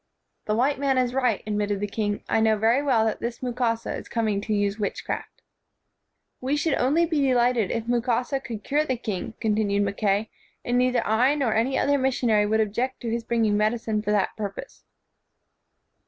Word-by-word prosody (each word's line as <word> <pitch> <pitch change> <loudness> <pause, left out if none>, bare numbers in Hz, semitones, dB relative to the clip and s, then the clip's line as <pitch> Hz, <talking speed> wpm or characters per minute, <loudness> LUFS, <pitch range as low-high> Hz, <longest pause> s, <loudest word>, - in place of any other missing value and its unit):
"The 215 - 0
white 265 +4 +1
man 275 -2 +1
is 250 -1 +1
right," 250 -5 +1
admitted 205 -1 -1
the 205 - -1
king. 205 0 -2
"I - - +2
know 220 -1 +3
very 225 +5 +3
well 250 -6 +2
that 220 - -1
this 235 +2 -5
Mukasa 240 -2 -1
is - - -8
coming 215 -4 0
to 215 - -5
use 205 0 0
witchcraft." 205 - -4 1.0
"We 265 +3 0
should 305 0 0
only 295 +8 +2
be 315 -3 0
delighted 245 -5 +2
if 230 -1 -2
Mukasa 245 +2 0
could 230 -5 -7
cure 295 +2 +1
the 260 -5 -2
king," 215 -2 -5
continued 210 -2 +1
Mackay, 200 +1 0 0.3
"and 245 +1 +1
neither 250 -1 +1
I 245 +7 +3
nor 265 -7 0
any 240 +5 +1
other 285 0 +2
missionary 240 -5 +2
would 220 +1 +2
object 240 +5 -2
to 230 - -3
his 235 0 -2
bringing 225 -3 +1
medicine 215 0 0
for 210 - -4
that 210 -2 +1
purpose." 215 - -7
230 Hz, 185 wpm, -25 LUFS, 210-255 Hz, 1.0 s, know